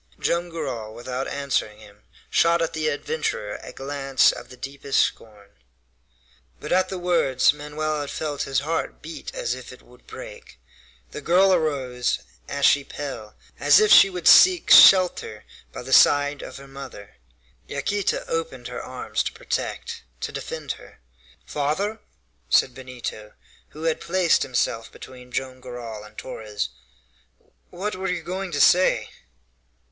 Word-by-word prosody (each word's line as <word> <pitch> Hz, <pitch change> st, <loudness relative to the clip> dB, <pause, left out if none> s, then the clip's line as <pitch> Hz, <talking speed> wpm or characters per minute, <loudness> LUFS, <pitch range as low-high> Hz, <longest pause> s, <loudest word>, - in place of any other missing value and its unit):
Joam 175 Hz, +1 st, 0 dB
Garral, 130 Hz, -10 st, -5 dB
without 125 Hz, +2 st, -4 dB
answering 140 Hz, -7 st, -2 dB
him, 105 Hz, -1 st, -17 dB, 0.3 s
shot 170 Hz, +1 st, +3 dB
at 165 Hz, 0 st, -1 dB
the 155 Hz, -1 st, -1 dB
adventurer 145 Hz, -8 st, -3 dB
a -, -, -9 dB
glance 135 Hz, -1 st, +1 dB
of -, -, -10 dB
the 125 Hz, -, -13 dB
deepest 135 Hz, +1 st, -2 dB
scorn. 105 Hz, -2 st, -2 dB, 1.1 s
But -, -, -7 dB
at 185 Hz, +1 st, +2 dB
the 190 Hz, -, -4 dB
words 170 Hz, -8 st, +2 dB
Manoel 150 Hz, +1 st, -3 dB
had 145 Hz, -, -5 dB
felt 150 Hz, -2 st, -4 dB
his 135 Hz, 0 st, 0 dB
heart 160 Hz, +1 st, -3 dB
beat 160 Hz, +1 st, -8 dB
as -, -, -2 dB
if -, -, -9 dB
it -, -, -14 dB
would -, -, -21 dB
break. -, -, -11 dB, 0.5 s
The -, -, -7 dB
girl 190 Hz, +2 st, +4 dB
arose, 135 Hz, -7 st, 0 dB, 0.3 s
ashy 140 Hz, 0 st, +3 dB
pale, 125 Hz, -8 st, -7 dB, 0.2 s
as 145 Hz, 0 st, +6 dB
if 215 Hz, -1 st, +3 dB
she 195 Hz, -, +9 dB
would 180 Hz, -3 st, -3 dB
seek 365 Hz, -2 st, +7 dB
shelter 180 Hz, -, +7 dB, 0.3 s
by -, -, -8 dB
the -, -, -3 dB
side 145 Hz, 0 st, +5 dB
of -, -, -9 dB
her 140 Hz, 0 st, -12 dB
mother. 135 Hz, -, -11 dB, 0.5 s
Yaquita 195 Hz, +8 st, -2 dB
opened 135 Hz, -7 st, -4 dB
her 125 Hz, -, -6 dB
arms 130 Hz, 0 st, -3 dB
to -, -, -2 dB
protect, -, -, -4 dB, 0.2 s
to -, -, -3 dB
defend -, -, -5 dB
her. -, -, -11 dB, 0.5 s
"Father," 185 Hz, +10 st, -2 dB, 0.5 s
said 125 Hz, -, +3 dB
Benito, 125 Hz, -4 st, -8 dB, 0.4 s
who 155 Hz, -, -10 dB
had 165 Hz, -1 st, 0 dB
placed 180 Hz, -2 st, +2 dB
himself 115 Hz, -3 st, -1 dB
between 125 Hz, -1 st, -13 dB
Joam 130 Hz, 0 st, -4 dB
Garral 120 Hz, -4 st, -8 dB
and 105 Hz, 0 st, -15 dB
Torres, 105 Hz, -5 st, -5 dB, 1.0 s
"what 200 Hz, +3 st, -4 dB
were 190 Hz, +1 st, -3 dB
you 180 Hz, -2 st, -2 dB
going 185 Hz, +2 st, -4 dB
to 145 Hz, -, -2 dB
say?" 180 Hz, +6 st, +4 dB
145 Hz, 150 wpm, -24 LUFS, 125-170 Hz, 1.1 s, she